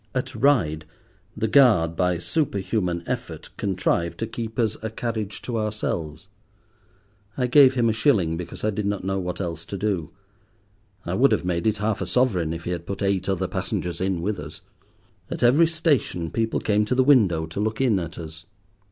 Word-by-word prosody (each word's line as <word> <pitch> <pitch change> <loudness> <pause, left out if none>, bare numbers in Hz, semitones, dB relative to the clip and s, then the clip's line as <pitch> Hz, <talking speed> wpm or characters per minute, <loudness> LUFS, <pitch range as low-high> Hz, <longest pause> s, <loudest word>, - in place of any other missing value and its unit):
At 130 - -2
Ryde 80 - +2 0.5
the 110 - 0
guard, 105 - +5
by 90 0 +1
superhuman 95 - -1
effort, - - -5
contrived 90 -3 -1
to 115 - -2
keep 115 0 -6
us 110 -3 +1
a 110 - -3
carriage 110 -2 -4
to 120 -3 -2
ourselves. 90 -6 -3 1.1
I 125 - +1
gave 130 +1 +6
him 120 -2 +2
a 110 - +2
shilling, 105 - +2
because 85 +1 -7
I 110 - +2
did 105 0 -2
not 100 -2 -2
know 95 +1 -1
what 90 -1 -4
else 85 -3 -4
to 100 - -5
do. 95 -6 -1 1.0
I 85 - -3
would 130 +8 +4
have - - +1
made 85 +1 0
it 110 -1 +1
half 105 0 -1
a 95 - -2
sovereign 95 -7 +1
if 80 0 -5
he 90 - -3
had 85 -1 -5
put 100 +1 -4
eight 100 -1 0
other 95 -3 0
passengers 90 0 -3
in 95 -3 -1
with 100 0 -2
us. - - -9 0.7
At - - -4
every 140 +8 +5
station 145 - 0
people 115 -1 0
came 105 0 +2
to 115 - 0
the 130 - +4
window 105 - +4
to 80 +4 -7
look 110 +1 -1
in 120 -7 +3
at 85 -2 -6
us. 80 0 -9
100 Hz, 190 wpm, -24 LUFS, 85-115 Hz, 1.1 s, gave